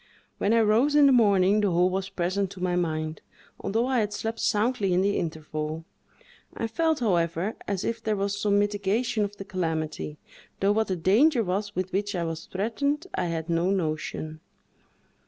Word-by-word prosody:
When 200 - +1
I 230 0 +5
rose 230 +7 +3
in 295 -1 +7
the 275 - +6
morning, 205 -4 +4
the 205 - +2
whole 180 +1 +3
was 190 +1 -2
present 190 +1 -1
to 185 - -12
my 180 -1 0
mind, 155 -2 -2 0.4
although 225 +4 0
I 260 -1 +1
had 210 -1 -1
slept 225 +2 -3
soundly 210 -3 +1
in 180 - +3
the 200 +1 +1
interval; 155 -1 -4 0.7
I - - -1
felt, 315 +6 0
however, 175 -1 0
as 200 -2 -2
if 230 0 -2
there 215 -1 0
was 200 0 -1
some 200 0 +1
mitigation 205 +3 0
of 205 0 -4
the 195 - -7
calamity, 160 -5 -3 0.4
though 195 +1 +3
what 220 +1 +1
the 185 - -1
danger 230 - +4
was 200 +2 -2
with 185 0 -3
which 200 +1 -1
I 175 - -1
was 165 -1 -5
threatened, 280 - -1
I - - -1
had 165 -1 -3
no 170 +1 +1
notion. 155 -3 -2
195 Hz, 185 wpm, -26 LUFS, 175-220 Hz, 0.7 s, in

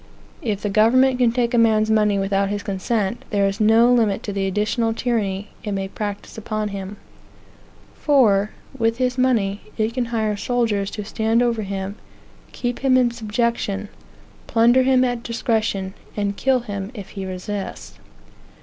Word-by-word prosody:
If 210 -4 -2
the 205 - 0
government 250 +5 +4
can 240 -2 +4
take 240 0 0
a 240 - +4
man's 220 -1 +3
money 210 -2 +3
without 195 0 0
his 205 0 -3
consent, 200 +2 -2
there 200 -3 +2
is 195 +2 -3
no 225 +3 +5
limit 220 -5 +2
to 205 - -4
the 195 -1 -1
additional 220 +3 0
tyranny 210 -5 -1
it 210 -2 -3
may 195 0 -2
practise 205 +1 -6
upon 215 -1 -3
him; 200 0 -6 1.0
for, 215 -9 +3 0.3
with 230 -2 0
his 255 0 0
money, 220 -6 +1 0.2
it 220 +1 0
can 250 -1 -1
hire 220 -3 -1
soldiers 210 -3 0
to 210 -1 -6
stand 225 +3 +1
over 235 -2 0
him, 195 0 -4 0.5
keep 245 -1 -3
him 265 -1 +3
in 245 -2 +3
subjection, 220 -3 -2 0.6
plunder 240 +2 +4
him 260 0 +4
at 245 -2 -1
discretion, 220 -5 -1 0.2
and 200 -1 -1
kill 260 +3 +2
him 200 -4 -5
if 200 -4 -8
he 195 - -6
resists. 190 - -6
215 Hz, 160 wpm, -21 LUFS, 200-235 Hz, 1.0 s, no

